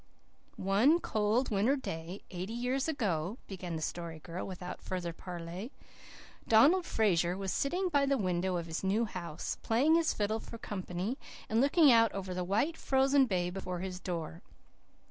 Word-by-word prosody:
"One 215 - +4
cold 220 0 0
winter 215 +7 +3
day, 175 - -6
eighty 185 +4 -5
years 250 +4 -1
ago," 200 - -1
began 180 -3 -5
the 160 - -3
Story 170 0 -4
Girl 170 +3 -6
without 180 -1 -7
further 175 -2 -4
parley, 175 +6 -7 0.8
"Donald 310 +12 +5
Fraser 180 -5 +2
was 195 -1 -2
sitting 360 +7 0
by 285 -5 +2
the 275 0 +2
window 185 -3 0
of 170 - -3
his 165 +2 -4
new 205 +5 +2
house, 170 -6 -5
playing 260 +8 +3
his 330 -1 +4
fiddle 215 +1 -1
for 230 - -9
company, 195 +3 -4 0.3
and 225 +2 +3
looking 285 +1 +6
out 230 -1 +5
over 190 -2 -4
the 180 0 -2
white, 225 - 0
frozen 270 0 +3
bay 180 -4 0
before 180 -1 -4
his 185 -1 -5
door. 170 -2 -5
195 Hz, 165 wpm, -32 LUFS, 180-255 Hz, 0.8 s, looking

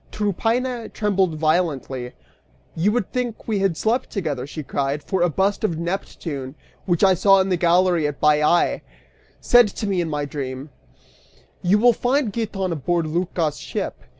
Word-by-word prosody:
Tryphaena 230 +4 -1
trembled 195 -5 0
violently, 150 -6 -1 0.6
"You 180 +6 +2
would 225 -3 -1
think 245 -3 -3
we 215 -3 0
had 195 -4 0
slept 240 +4 0
together," 145 - -3
she 155 +1 -6
cried, 140 +1 -2
"for 190 -2 -1
a 175 - +3
bust 195 +7 0
of 175 -7 0
Neptune, 160 -6 -5 0.3
which 175 -1 +1
I 190 -1 +6
saw 195 +2 +5
in 190 0 +1
the 185 - +2
gallery 175 -1 +3
at 145 -1 -5
Baiae, 150 +3 +3 0.6
said 245 -2 +6
to 210 - -5
me, 195 -3 0
in 165 - -3
my 150 -1 -2
dream 135 0 -6 0.9
You 185 +3 +3
will 240 +3 +5
find 250 -2 0
Giton 200 -5 -2
aboard 170 +2 -1
Lycas' 165 -1 -1
ship!" - - -5
175 Hz, 160 wpm, -22 LUFS, 155-205 Hz, 0.9 s, I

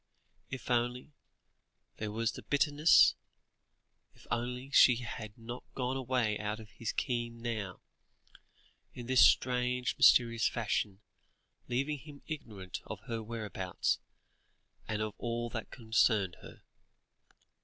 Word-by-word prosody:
If 130 -1 -6
only 120 +4 0 0.8
there 105 -1 -4
was 115 +1 0
the - - -9
bitterness 145 +2 +5 1.0
if - - -19
only 125 +3 -3
she 125 -2 +7
had 110 -3 -7
not 120 +2 -7
gone 130 0 -1
away 125 -5 0
out 105 +1 -3
of 110 -1 -12
his 115 - -4
ken 120 -2 -2
now, 110 -5 -4 1.1
in 120 - -7
this 130 0 +5
strange 125 -1 +3
mysterious 115 -3 +5
fashion, 105 -3 -2 0.7
leaving 135 +4 -1
him 145 0 -13
ignorant 105 - -6
of - - -6
her 115 -1 -4
whereabouts, 105 -5 -2 0.9
and 110 -1 -1
of 110 -1 -4
all 120 0 -3
that 110 - -5
concerned 110 -5 +1
her. - - -13
120 Hz, 120 wpm, -32 LUFS, 110-125 Hz, 1.1 s, she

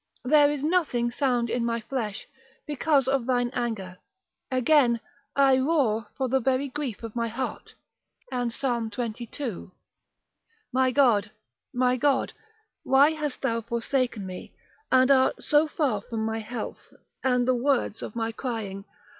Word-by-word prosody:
there 290 +2 +5
is 290 -2 -3
nothing 300 -8 +1
sound 245 -2 +1
in 240 +1 -1
my 235 0 0
flesh, 220 -2 -4 0.4
because 290 -2 +1
of 265 -2 +1
thine 245 -1 +1
anger. 200 -7 -3 0.5
Again, 255 -2 +3 0.4
I 270 -2 +5
roar 260 -7 +1
for 265 -2 0
the 265 +2 +2
very 265 +2 0
grief 260 -6 -5
of 225 -1 -7
my 230 -1 0
heart: 245 +4 -5 0.6
and 245 -2 -1
Psalm 235 -3 -1
xxii. 235 -2 -5 1.0
My 260 0 +3
God, 240 -6 +3 0.4
my 250 0 +2
God, 275 0 +1 0.5
why 275 +3 +5
hast 300 -4 -4
thou 230 0 0
forsaken 235 -1 -1
me, 185 -1 -8 0.4
and 260 +1 +5
art 260 -1 +3
so 300 +1 +4
far 275 -9 0
from 220 0 -4
my 220 0 -2
health, 225 +1 -7 0.3
and 250 -1 +2
the 255 - +4
words 250 -3 0
of - - -7
my 225 -1 -1
crying? 220 -5 -5
250 Hz, 145 wpm, -26 LUFS, 230-270 Hz, 1.0 s, there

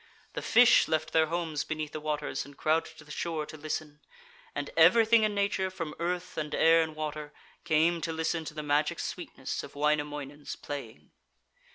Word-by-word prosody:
The - - -4
fish 245 0 +6
left 155 0 -1
their 160 -1 +4
homes 165 -2 -2
beneath 155 -1 -4
the 155 - -5
waters 150 -2 -2
and 140 0 -14
crowded 160 +1 0
to - - -12
the 150 - -13
shore 160 -1 -3
to 155 - -10
listen. 150 -1 -5 0.6
And - - -3
everything 230 0 +6
in 215 -1 +1
nature, 200 -2 0
from 165 -5 -5
earth 180 +1 -3
and 150 -1 -3
air 165 0 +5
and 160 -1 -3
water, 150 -1 -5 0.3
came 165 +1 +3
to 165 - -2
listen 160 0 -1
to 155 - -7
the 150 - -4
magic 150 +1 +1
sweetness - - -5
of - - -11
Wainamoinen's 145 -1 -2
playing. 115 - -8
155 Hz, 180 wpm, -29 LUFS, 150-170 Hz, 0.6 s, fish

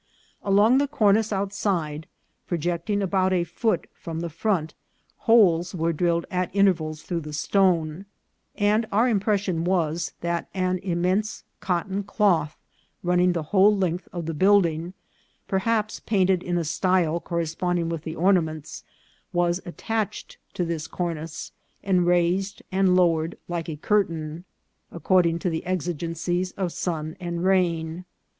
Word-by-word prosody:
Along 205 +6 +4
the 285 - +1
cornice 220 -5 +2
outside, 190 -6 -2 0.4
projecting 175 +4 -1
about 190 0 +1
a 175 -2 +2
foot 175 +2 -1 0.2
beyond 165 -1 -4
the 170 -1 -4
front, 170 -2 -1 0.6
holes 185 -6 +5
were' 165 0 0
drilled 170 +1 +1
at 180 -1 0
intervals 165 -6 +2
through 175 -2 -2
the 150 -1 -8
stone; 175 +1 +1 0.5
and 215 +2 +2
our 225 +5 +3
impression 200 -6 0
was, 170 -2 0
that 170 0 -2
an 185 -1 0
immense 185 +3 -1 0.2
cotton 190 +2 -1
cloth, 195 -7 +1 0.5
running 180 0 +3
the 165 -2 -2
whole 205 +1 +6
length 180 -2 -1
of 175 -2 -5
the 165 - -3
building, 175 -1 +2 0.5
perhaps 215 +2 0
paint 190 -3 +2
ed 185 -2 +1
in 175 -1 -2
a 170 - 0
style 170 0 +1
corresponding 170 +1 -1
with 165 -2 -3
the 160 0 -6
ornaments, 160 -4 0 0.5
was 175 0 +1
at 175 - -8
tached 220 -3 -3 0.2
to 180 - 0
this 165 -2 -3
cornice, 165 -3 -4 0.3
and 180 -3 +2
raised 180 +3 +1
and 190 -1 +3
lowered 165 -2 +2
like 170 -1 -3
a 155 - -4
curtain, 165 -2 -1 0.5
according 170 -1 +2
to 175 +1 -2
the 160 - -3
exigencies 175 0 -2
of 185 -3 -2
sun 160 -3 -3
and 175 -1 -4
rain. 175 -2 +1
175 Hz, 140 wpm, -25 LUFS, 165-195 Hz, 0.6 s, whole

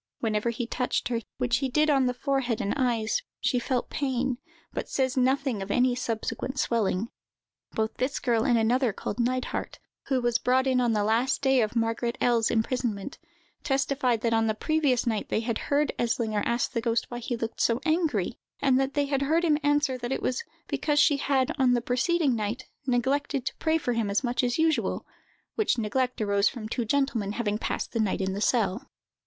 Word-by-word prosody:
Whenever 215 0 0
he 235 +1 -3
touched 245 +1 -1
her, 235 -2 -1 0.2
which 245 -2 +1
he 270 0 -1
did 300 +4 +2
on 270 -4 +3
the 250 - 0
forehead 260 -3 -1
and 200 - -1
eyes, 235 -5 +1 0.2
she 250 - +1
felt 250 0 -2
pain, 260 -2 -1 0.3
but - - -4
says 260 -1 0
nothing 260 -3 +1
of 195 - -5
any 250 +3 +3
subsequent 245 +2 -3
swelling. 225 -3 0 0.6
Both 220 0 -2
this 265 +2 -1
girl 235 -3 +1
and 240 - +3
another, 235 +1 +2
called 205 - -5
Neidhardt, 255 +1 -1 0.3
who 265 -2 +2
was 240 -1 +1
brought 260 +1 +2
in 260 -1 +2
on 240 -2 +2
the 210 -1 +1
last 235 +7 +1
day 265 -2 +4
of 215 +1 -1
Margaret 230 +1 0
L——'s 235 -2 +3
imprisonment, 230 0 -1 0.4
testified 270 -4 +1
that 230 -1 +1
on 225 0 +2
the 215 - 0
previous 285 -1 +1
night 220 -3 -1
they - - +1
had 230 -1 -2
heard 290 +1 +2
Eslinger 225 -3 0
ask 235 +1 0
the 230 - -1
ghost 230 0 -1
why 240 - -4
he 240 0 -3
looked 225 0 -4
so 230 +1 +2
angry; 310 - 0 0.2
and 265 -2 +3
that 270 +1 -1
they 290 -1 +2
had 275 -1 -1
heard 320 +5 +2
him 300 -2 +3
answer 290 -3 +1
that 240 +1 -4
it - - -2
was 255 - -1 0.2
"because 295 -1 +1
she 295 -1 +5
had 270 -2 +1
on 255 -2 +4
the - - +2
preceding 265 +3 +1
night 220 +3 -3 0.2
neglected 265 +2 0
to - - -3
pray 320 0 +2
for 250 -6 -1
him 230 -3 0
as 200 +6 +1
much 245 0 0
as 245 -1 +1
usual," 320 -1 +1 0.5
which 430 - +1
neglect 250 +3 -1
arose 200 -1 +3
from 220 -3 -7
two 240 +1 -2
gentlemen 230 -5 0
having 210 -2 -1
passed - - -3
the 230 - -2
night 210 -3 +1
in 190 0 -1
the 200 - -4
cell. 215 -3 +1
245 Hz, 200 wpm, -27 LUFS, 225-270 Hz, 0.6 s, she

